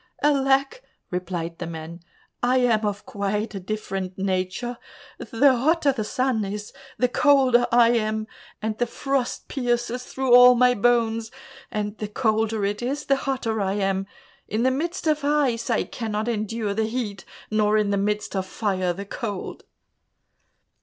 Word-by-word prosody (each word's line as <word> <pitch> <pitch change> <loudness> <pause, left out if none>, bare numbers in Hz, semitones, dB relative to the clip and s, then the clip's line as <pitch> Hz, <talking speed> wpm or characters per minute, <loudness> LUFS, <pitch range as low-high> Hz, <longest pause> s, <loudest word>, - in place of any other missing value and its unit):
"Alack," 275 - +2 0.3
replied 175 -2 -4
the 175 - -4
man, 165 +1 -7 0.4
"I 250 +1 +3
am 230 -4 +2
of 205 0 -4
quite 210 +2 -2
a 195 - -4
different 190 -1 -4
nature. 190 +5 -2 0.4
The 265 +3 +3
hotter 290 +3 +2
it 230 +1 0
is, 210 0 -6 0.2
the 250 - +3
colder 260 -2 +4
I 235 -1 +6
am, 220 -2 0 0.4
and 220 0 -1
the 245 - +1
frost 270 +1 -2
pierces 245 -1 -1
through 265 -1 0
all 250 0 +9
my 250 +1 +5
bones; 230 -1 +1 0.4
and 210 0 -3
the 210 - -3
colder 220 -1 0
it 205 +2 -2
is, 275 +4 -3
the 275 - +3
hotter 255 -5 -2
I 190 -1 0
am. 195 -1 -1 0.4
In 220 +3 -1
the 260 - +3
midst 335 +8 -3
of 305 -2 +1
ice, 280 -6 +1
I 230 - +2
cannot 220 -1 -4
endure 215 -2 -2
the 220 +2 0
heat, 220 -5 -4 0.3
nor 215 0 +3
in 210 -1 +1
the - - +2
midst 210 +1 -1
of 190 -1 -2
fire, 185 -4 -1
the 200 +3 -7
cold." 205 -1 -5
225 Hz, 155 wpm, -24 LUFS, 205-250 Hz, 0.4 s, all